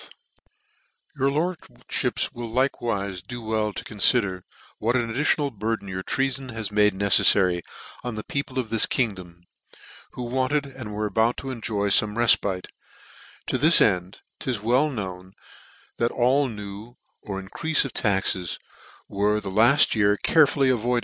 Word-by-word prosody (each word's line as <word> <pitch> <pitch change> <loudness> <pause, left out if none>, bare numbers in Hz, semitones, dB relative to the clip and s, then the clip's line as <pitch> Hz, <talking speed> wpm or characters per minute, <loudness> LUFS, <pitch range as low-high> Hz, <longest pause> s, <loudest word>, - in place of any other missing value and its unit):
Cf - - -15 1.1
Your 135 +1 +2
lordfhips 155 - -3
will 120 -1 -6
likewife 110 -6 -1
do 120 +2 -6
well 110 -1 -1
to - - -7
con 105 - -11
fider 100 -5 +2 0.4
what 115 +3 0
an 120 -2 -1
additional 145 +2 0
burden 110 -1 -3
your 95 0 -4
treafon 135 +3 -2
has 110 -2 -4
made 105 -1 +3
ncceffary 95 -2 +4 0.4
on 120 -2 -4
the 110 - -5
people 140 -1 -4
of 125 -4 -3
this 115 - +4
kingdom, 95 -8 -3 0.7
who 125 - -6
wanted 130 +4 -1
and 130 -6 -9
were 105 0 -2
about 110 +3 +1
to 135 - -5
enjoy 110 -4 -2
fome 105 +1 +3
refpite: 100 -5 +2 0.8
to - - -2
tliis 160 +2 +8
end, 90 -2 +1 0.2
'tis 125 -5 -2
well 125 +8 +2
known, 95 -6 -7 0.6
that 120 - +1
all 130 +4 +2
new, 105 +1 -9 0.3
or 100 -2 -5
in 95 - -10
creafc 160 - +2
of 135 - -6
taxes, 95 -4 0 0.5
were 105 +2 0
the 100 -2 -6
hit 120 +8 +4
year 105 -2 +2
carefully 145 -2 +3
avoided, 120 -4 0
VOL. 120 - +2
110 Hz, 155 wpm, -24 LUFS, 100-130 Hz, 1.1 s, tliis